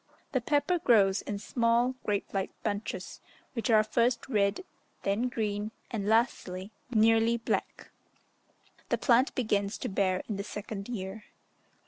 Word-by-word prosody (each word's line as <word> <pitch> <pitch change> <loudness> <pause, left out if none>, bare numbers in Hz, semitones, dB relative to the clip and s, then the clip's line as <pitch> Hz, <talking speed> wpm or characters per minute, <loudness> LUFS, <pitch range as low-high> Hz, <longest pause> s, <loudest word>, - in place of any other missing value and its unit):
The 260 - +1
pepper 295 +7 +1
grows 210 - +4
in 205 - -4
small, 235 +4 +2
grape 205 -1 -2
like 195 -1 -1
bunches, 200 -2 -4 0.3
which 235 -1 -2
are 215 -2 +6
first 235 +2 +1
red, 210 - +1 0.4
then 210 +6 +1
green, 210 -2 -2 0.2
and 205 -4 -2
lastly, 210 -4 +1 0.2
nearly 225 0 +4
black. 230 - -3 1.0
The - - +2
plant 250 +1 +3
begins 205 -3 0
to - - -4
bear 190 -2 +1
in 210 - -3
the 200 - -3
second 205 0 -6
year. 205 -2 -5
215 Hz, 135 wpm, -30 LUFS, 200-235 Hz, 1.0 s, are